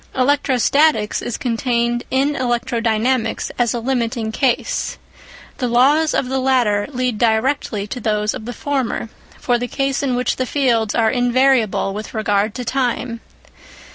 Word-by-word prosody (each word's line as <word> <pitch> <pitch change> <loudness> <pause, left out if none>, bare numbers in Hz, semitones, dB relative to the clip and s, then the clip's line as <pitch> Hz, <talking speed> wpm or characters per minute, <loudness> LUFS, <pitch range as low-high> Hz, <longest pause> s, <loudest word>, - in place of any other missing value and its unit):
Electrostatics 275 -2 +2
is 240 - -4
contained 240 -1 -1
in 270 +3 +1
electrodynamics 240 -2 0
as 240 -2 +2
a - - -1
limiting 235 -2 -1
case; 250 +2 -1 0.6
the 250 - 0
laws 285 +6 +3
of 250 - 0
the 265 +1 -1
latter 245 -6 +2
lead 250 -5 -2
directly 225 -2 +1
to 245 +5 -6
those 210 -2 0
of 215 - -7
the 245 - -4
former 260 -4 -2 0.3
for 245 -1 +1
the 245 - -2
case 275 +2 -1
in 265 -3 0
which 250 +1 -1
the 255 - -1
fields 235 -7 +1
are 225 -2 +3
invariable 245 -5 +2
with 215 +3 -7
regard 205 0 0
to 250 - -5
time. 245 -2 -1
245 Hz, 145 wpm, -19 LUFS, 225-265 Hz, 0.6 s, laws